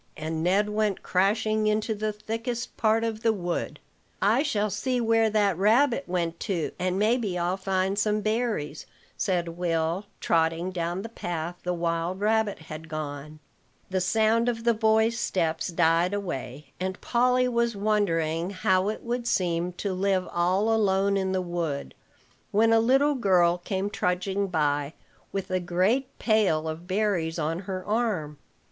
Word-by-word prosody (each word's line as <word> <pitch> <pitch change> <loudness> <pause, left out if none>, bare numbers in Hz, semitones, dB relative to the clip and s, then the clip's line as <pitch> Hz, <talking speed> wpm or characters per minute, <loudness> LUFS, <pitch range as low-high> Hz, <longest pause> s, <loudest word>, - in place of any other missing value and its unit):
And 160 +1 -3
Ned 195 +5 +2
went 210 -2 -1
crashing 215 +3 +1
into 215 +1 +1
the 215 0 -2
thickest 230 +3 -4
part 225 0 +2
of 225 -1 -2
the 225 -1 +3
wood. 175 -5 -3 0.4
"I 220 +7 +3
shall 215 -8 0
see 255 +5 -1
where 225 -1 +3
that 205 -4 +1
rabbit 240 +6 +3
went 170 -2 -2
to, 180 -7 -2
and 185 +1 0
maybe 215 -3 +1
I'll 175 +1 0
find 190 +1 -1
some 210 0 +1
berries," 215 -9 -2 0.3
said 175 -4 0
Will, 170 +2 -1
trotting 165 +2 +1
down 175 +1 -3
the - - -5
path 175 -5 -4
the 180 0 -2
wild 170 +2 -1
rabbit 215 0 +1
had 155 0 -9
gone. 150 -1 -6 0.5
The 185 0 +1
sound 225 +4 +2
of 230 -1 -3
the 235 0 +4
boys' 220 +1 +2
steps 165 -7 0
died 170 +2 +2
away, 140 -7 -5
and 185 0 -3
Polly 250 +1 +2
was 235 -2 0
wondering 175 -5 0
how 185 0 +1
it 215 - -5
would 240 0 -3
seem 175 -4 0
to 195 +2 -3
live 190 0 0
all 185 +6 +2
alone 200 -2 +2
in 190 -1 0
the 185 -1 0
wood, 170 -5 -3 0.6
when 225 +2 +3
a 225 - +6
little 270 +6 +3
girl 180 -8 +3
came 190 +2 -2
trudging 195 0 -1
by, 145 -4 0 0.4
with 195 -1 -4
a 185 - +1
great 185 +9 0
pail 195 -9 +2
of 160 +2 -6
berries 185 -5 0
on 165 +1 -1
her 185 -1 -5
arm. 205 -10 -1
190 Hz, 155 wpm, -26 LUFS, 170-220 Hz, 0.6 s, a